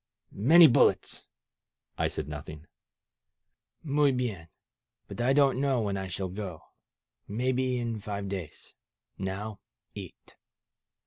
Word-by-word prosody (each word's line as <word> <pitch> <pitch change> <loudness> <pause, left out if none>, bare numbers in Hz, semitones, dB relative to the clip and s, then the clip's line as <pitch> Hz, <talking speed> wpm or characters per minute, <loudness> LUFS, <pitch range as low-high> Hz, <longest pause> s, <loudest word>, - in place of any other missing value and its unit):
Many 160 - +7
bullets!" 130 - +3 0.7
I - - +1
said - - -5
nothing. 75 +1 -8 1.2
Muy 145 -2 +3
hien! 115 -10 -3 0.6
But - - -6
I 125 +2 +3
don't 135 -2 +3
know 135 -3 +2
when 100 -2 -1
I 95 -1 -4
shall 95 +2 -3
go. 90 -4 -6 0.6
Maybe 125 +3 0
in 115 -2 -3
five 100 -1 -5
days. 95 -5 -7 0.5
Now 100 +2 -4 0.3
eat!" - - -11
110 Hz, 115 wpm, -29 LUFS, 95-130 Hz, 1.2 s, Many